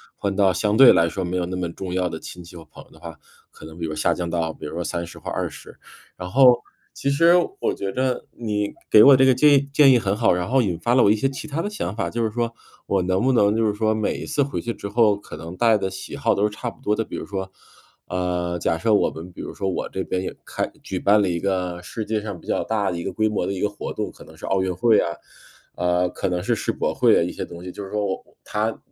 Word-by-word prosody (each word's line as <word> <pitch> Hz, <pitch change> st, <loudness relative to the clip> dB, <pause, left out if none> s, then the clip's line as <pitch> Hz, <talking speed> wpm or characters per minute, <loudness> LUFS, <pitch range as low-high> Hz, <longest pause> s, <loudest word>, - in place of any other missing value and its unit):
换 100 Hz, -1 st, -2 dB
到 100 Hz, -2 st, +4 dB
相 105 Hz, +3 st, 0 dB
对 130 Hz, +2 st, +9 dB
来 85 Hz, 0 st, +4 dB
说 95 Hz, +3 st, -3 dB
没 90 Hz, +1 st, -2 dB
有 90 Hz, -, 0 dB
那 90 Hz, +1 st, -5 dB
么 90 Hz, -2 st, -2 dB
重 95 Hz, -2 st, -6 dB
要 90 Hz, -1 st, 0 dB
的 80 Hz, -, -6 dB
亲 90 Hz, +2 st, -10 dB
戚 85 Hz, +1 st, -14 dB
和 80 Hz, -, -11 dB
朋 75 Hz, -, -14 dB
友 -, -, -25 dB
的 -, -, -18 dB
话， 85 Hz, -2 st, -9 dB, 0.4 s
可 -, -, -16 dB
能 80 Hz, +1 st, -11 dB
比 85 Hz, -, -3 dB
如 80 Hz, -, -4 dB
说 -, -, -4 dB
下 75 Hz, -, +1 dB
降 90 Hz, -, -3 dB
到 85 Hz, -1 st, -1 dB
比 -, -, -10 dB
如 75 Hz, -, -6 dB
说 85 Hz, -, -3 dB
30 85 Hz, 0 st, -5 dB
或 -, -, -6 dB
20。 -, -, -5 dB, 0.4 s
然 90 Hz, 0 st, -7 dB
后， 125 Hz, -1 st, +6 dB, 0.3 s
其 140 Hz, -, -2 dB
实 165 Hz, +4 st, +5 dB, 0.3 s
我 -, -, 0 dB
觉 100 Hz, 0 st, -4 dB
着 130 Hz, -1 st, -1 dB
你 105 Hz, -3 st, -3 dB, 0.2 s
给 105 Hz, -, +8 dB
我 140 Hz, -, +9 dB
这 135 Hz, -, +5 dB
个 130 Hz, -, +6 dB
建 145 Hz, +2 st, +5 dB
议 140 Hz, -, +5 dB
建 140 Hz, -2 st, +7 dB
议 125 Hz, -, +5 dB
很 100 Hz, -1 st, -1 dB
好， 110 Hz, -2 st, +3 dB
然 90 Hz, +3 st, -2 dB
后 130 Hz, 0 st, +4 dB
引 90 Hz, -6 st, -2 dB
发 120 Hz, +8 st, +1 dB
了 130 Hz, -, +5 dB
我 100 Hz, -, +5 dB
一 -, -, +4 dB
些 110 Hz, +5 st, 0 dB
其 135 Hz, -, -7 dB
它 155 Hz, +3 st, -2 dB
的 205 Hz, -, -3 dB
想 105 Hz, -, -4 dB
法， 110 Hz, -, -2 dB
就 115 Hz, 0 st, -2 dB
是 110 Hz, -, +1 dB
说， 115 Hz, 0 st, -2 dB, 0.3 s
我 100 Hz, -1 st, +1 dB
能 95 Hz, +1 st, 0 dB
不 130 Hz, -, +3 dB
能 105 Hz, -3 st, +3 dB
就 115 Hz, -, +2 dB
是 105 Hz, -, +1 dB
说 110 Hz, +1 st, +1 dB
每 110 Hz, -1 st, -1 dB
一 -, -, -6 dB
次 150 Hz, -2 st, +1 dB
回 140 Hz, -, -4 dB
去 115 Hz, -, -3 dB
之 100 Hz, -, -7 dB
后 105 Hz, -1 st, +3 dB
可 -, -, -10 dB
能 85 Hz, +3 st, -8 dB
带 115 Hz, 0 st, +4 dB
的 95 Hz, -, -2 dB
喜 95 Hz, 0 st, -8 dB
好 -, -, +1 dB
都 100 Hz, -, 0 dB
是 105 Hz, -, +3 dB
差 120 Hz, -, -4 dB
不 115 Hz, -, -16 dB
多 105 Hz, -5 st, +1 dB
的？ 115 Hz, -, -1 dB
比 -, -, -8 dB
如 -, -, -5 dB
说， 95 Hz, -1 st, -5 dB, 0.6 s
呃， 90 Hz, -1 st, -2 dB
假 80 Hz, -, 0 dB
设 105 Hz, +6 st, +1 dB
我 -, -, +3 dB
们 85 Hz, +3 st, -9 dB
比 -, -, -10 dB
如 -, -, -7 dB
说 95 Hz, -, -3 dB
我 95 Hz, -, -3 dB
这 95 Hz, -, -3 dB
边 90 Hz, -, -2 dB
也 95 Hz, -, -5 dB
开 -, -, -3 dB
举 -, -, -4 dB
办 105 Hz, +2 st, +4 dB
了 100 Hz, -, +1 dB
一 85 Hz, -1 st, -1 dB
个 90 Hz, -2 st, -2 dB
世 110 Hz, +4 st, -6 dB
界 110 Hz, 0 st, -1 dB
上 100 Hz, -4 st, -6 dB
比 -, -, -18 dB
较 -, -, 0 dB
大 105 Hz, -4 st, -1 dB
的 85 Hz, -, -4 dB
一 85 Hz, -, -4 dB
个 -, -, -3 dB
规 110 Hz, 0 st, +1 dB
模 105 Hz, -4 st, -1 dB
的 -, -, -2 dB
一 95 Hz, -, -5 dB
个 105 Hz, -, +1 dB
活 105 Hz, -, -6 dB
动， -, -, -4 dB
可 -, -, -15 dB
能 -, -, -16 dB
是 -, -, -8 dB
奥 95 Hz, 0 st, +1 dB
运 95 Hz, -1 st, -1 dB
会 110 Hz, +5 st, +4 dB
啊， 85 Hz, -1 st, -3 dB, 0.6 s
呃， 90 Hz, 0 st, +1 dB
可 -, -, -3 dB
能 90 Hz, 0 st, -2 dB
是 120 Hz, -, +1 dB
世 -, -, -2 dB
博 -, -, -2 dB
会 -, -, +4 dB
啊， -, -, +2 dB
一 -, -, -3 dB
些 -, -, -5 dB
东 85 Hz, 0 st, -9 dB
西， 90 Hz, -, -6 dB
就 100 Hz, -, -8 dB
是 95 Hz, -, -8 dB
说 105 Hz, -1 st, -1 dB
我 95 Hz, -, 0 dB
我 -, -, -28 dB
它 110 Hz, +1 st, -2 dB
100 Hz, 320 characters per minute, -23 LUFS, 90-115 Hz, 0.6 s, 对